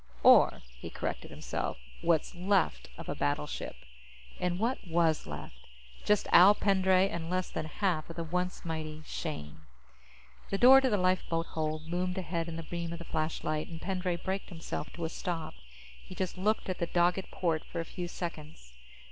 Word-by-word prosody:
Or, - - +7 0.2
he - - -6
corrected - - -4
himself, - - -4 0.2
what's 170 -2 +2
left 185 0 +1
of - - -8
a - - -1
battleship. 70 0 -2 0.6
And 180 -1 0
what 235 +6 0
was 165 -2 +2
left? 65 +1 -8 0.4
Just 210 -1 +2
Al 190 +4 +9
Pendray 190 -2 +3
and 170 -3 -4
less 185 0 -1
than 155 - -3
half 170 -2 -1
of 165 - -7
the 170 - -3
once 180 +3 -2
mighty 155 -1 -4
Shane. 80 - -5 0.9
The 195 - 0
door 260 +4 +9
to 265 - +2
the 210 - +2
lifeboat 180 -3 +1
hold 155 0 -3
loomed 180 +2 -1
ahead 170 -2 -2
in 165 - -5
the 165 - -5
beam 170 +1 -4
of - - -5
the 170 - -9
flashlight, 155 -1 -2
and 165 -1 -8
Pendray 185 -1 -1
braked 190 +3 -3
himself 165 -4 -5
to 170 - -4
a - - -2
stop. 165 -2 -4 0.5
He 60 - -10
just 185 -2 -2
looked 210 +4 0
at 185 - -3
the 170 - 0
dogged 175 +2 +2
port 165 -3 0
for 170 - -6
a 165 - -2
few 175 +1 -5
seconds. 155 - -7
170 Hz, 180 wpm, -31 LUFS, 160-185 Hz, 0.9 s, Al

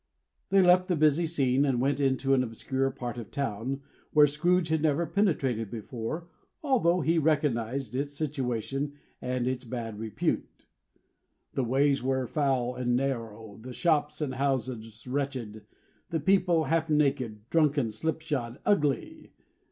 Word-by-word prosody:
They 195 -1 +5
left 180 +1 +5
the 180 - +1
busy 155 +2 +3
scene, 135 -4 +2
and 135 -4 +1
went 135 +2 +1
into 135 0 +2
an 130 - +4
obscure 130 +3 -1
part 120 -2 -5
of 115 - -6
the - - -24
town, 135 0 -3 0.3
where 150 -1 +8
Scrooge 165 +4 +1
had 160 -1 +1
never 155 +2 +2
penetrated 135 - 0
before, 120 - -5 0.4
although 185 - +3
he 165 +3 +2
recognized 140 -5 0
its 145 +2 -2
situation 135 -2 -2 0.3
and 125 -1 -1
its 130 0 -2
bad 115 -3 -5
repute. 110 -2 -3 0.9
The 135 - 0
ways 135 +3 +2
were 130 0 0
foul 130 -3 0
and 125 -1 0
narrow; 115 -5 -3
the 125 +2 -8
shops 150 +2 +1
and 140 -4 -1
houses 125 -4 -2
wretched; 125 -6 -4 0.4
the 165 -2 -1
people 175 0 +3
half 165 0 0
naked, 135 -8 0
drunken, 145 -7 +2
slipshod, 140 -1 -3
ugly. 150 - 0
135 Hz, 145 wpm, -28 LUFS, 120-155 Hz, 0.9 s, where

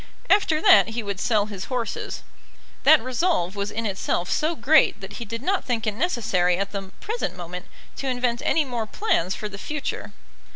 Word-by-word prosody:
After 350 -6 +4
that 380 -5 +7
he 225 +1 -3
would 200 -2 -4
sell 210 -2 +2
his 200 -3 -6
horses. 250 -3 -4 0.6
That 305 -2 +7
resolve 255 - 0
was 200 0 -2
in 225 +1 -3
itself 190 -3 -1
so 320 +2 +1
great 285 +2 +4
that 200 0 -8
he 235 - -5
did 230 +3 -6
not 390 +4 +1
think 235 -3 -2
it 215 - 0
necessary 200 - +1
at 200 +1 -2
the 195 -2 -6
present 430 - -3
moment 180 +1 -7 0.3
to 275 - -4
invent 245 -2 0
any 320 -2 +2
more 240 -4 -3
plans 200 - 0
for 210 - -5
the 200 -1 -9
future. 300 +4 -4
230 Hz, 190 wpm, -24 LUFS, 200-290 Hz, 0.6 s, that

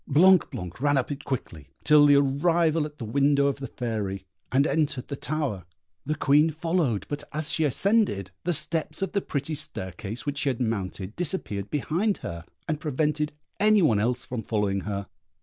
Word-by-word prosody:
Blanc 180 +6 +5
blanc 105 - -7
ran 145 0 +3
up 135 - -1
it 145 0 -5
quickly, 80 - -5
till 150 -1 +6
the 145 - +6
arrival 155 +3 +2
at 150 0 -16
the 115 - -5
window 140 +4 +3
of 140 -1 +1
the 135 -1 -6
Fairy, 105 -6 -4 0.3
and 135 +2 +3
entered 150 -5 0
the 140 - -3
tower: 140 - -2 0.4
the 155 - 0
Queen 150 +1 +4
followed, 160 - 0
but 145 0 -4
as 155 0 0
she 160 - +2
ascended, 150 - +2
the 175 - 0
steps 160 +1 0
of 195 - -2
the 200 - 0
pretty 145 0 -3
staircase 105 - -4
which 145 -1 -2
she 145 - +1
had 125 - -2
mounted 100 -4 -3
disappeared 145 - -2
behind 170 +8 0
her, 85 0 -6 0.2
and 155 -2 -1
prevented 150 0 -1 0.3
any 210 -1 +5
one 110 -10 +4
else 120 +3 -1
from 120 -2 -4
following 105 -3 0
her. 100 0 -4
145 Hz, 185 wpm, -26 LUFS, 115-155 Hz, 0.4 s, till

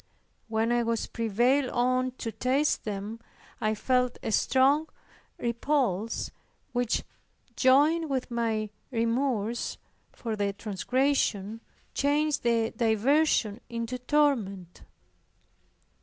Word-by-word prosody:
When 225 +1 0
I 240 0 +3
was 230 -1 -1
prevailed 240 +5 +1
on 255 +1 +1
to 235 -3 -5
taste 260 +7 +1
them, 210 +2 -4 0.4
I 215 0 +1
felt 250 +2 +1
a - - -2
strong 275 +7 +3 0.5
repulse 235 -4 -1 0.4
which, 245 -1 0 0.5
joined 295 +5 +4
with 260 -2 -2
my 220 -3 -1 0.2
remorse 235 -1 -1 0.3
for 225 -3 -4
the 200 -1 -1
transgression, 220 0 0 0.3
changed 295 +1 +1
the 230 -1 +1
diversion 230 0 +2
into 235 +1 -4
torment. 240 - 0
240 Hz, 95 wpm, -28 LUFS, 220-265 Hz, 0.5 s, joined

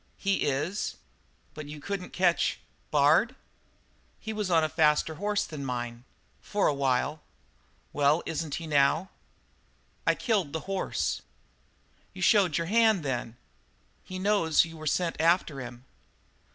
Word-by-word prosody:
"He 195 -1 0
is." 155 +9 -2 0.6
"But 150 -1 -8
you 150 +1 -8
couldn't 190 +4 -4
catch 180 -2 +1 0.3
Bard?" 155 - +4 0.8
"He 220 - -5
was 210 -3 -2
on 165 -2 +4
a - - +2
faster 155 0 +2
horse 205 +4 -1
than 150 -6 -7
mine 120 -2 -4 0.4
for 205 -1 -1
a - - +3
while." 140 +2 0 0.7
"Well? 145 +3 +3
Isn't 160 -2 -3
he 165 - -5
now?' 150 +4 +2 1.0
"I - - +4
killed 200 - 0
the 160 - -2
horse." 195 -1 -2 0.9
"You - - -4
showed 195 -8 +4
your 170 - -1
hand, 220 -2 +3
then? 120 -4 -3 0.7
He 185 - -7
knows 185 -6 +3
you 165 0 -10
were 155 -1 -7
sent 165 +1 0
after 165 -4 +2
him?" 120 0 -9
160 Hz, 140 wpm, -28 LUFS, 145-190 Hz, 1.0 s, Bard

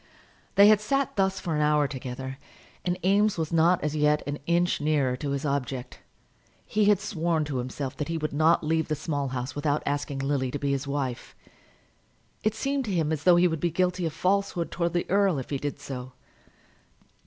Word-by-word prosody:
They 200 +1 +8
had 210 -1 +6
sat 275 +5 0
thus 195 -1 +1
for 170 - -3
an 150 - +1
hour 150 -1 +3
together, 130 0 -6 0.4
and 180 0 -1
Eames 205 +1 +3
was 160 0 -2
not 165 +2 +3
as 150 0 -1
yet 150 0 +2
an 145 0 -4
inch 175 -1 +2
nearer 145 -4 +1
to 145 +1 -4
his 140 +2 -2
object. 135 -3 -3 0.7
He 210 0 +1
had 205 -2 +4
sworn 170 -6 -1
to 145 -3 -3
himself 130 +2 -4
that 150 - -3
he 165 0 -2
would 155 -2 -3
not 160 +3 +3
leave 160 +1 0
the 155 - -1
Small 145 -2 -2
House 130 0 -4
without 145 0 -1
asking 145 -1 -2
Lily 135 -1 0
to 145 - -3
be 140 0 -1
his 140 0 -2
wife. 135 -3 -3 1.1
It 215 0 0
seemed 275 -1 -1
to 210 - -3
him 160 -4 0
as 155 -1 -3
though 180 -1 +7
he 175 +1 +5
would 160 -2 -2
be 175 - +1
guilty 180 +1 0
of 155 - -5
falsehood 185 0 0
towards 170 0 -1
the 175 - 0
earl 195 -4 +3
if 130 - -6
he 140 - -1
did 145 0 -4
so. 130 -2 -7
155 Hz, 205 wpm, -27 LUFS, 140-180 Hz, 1.1 s, They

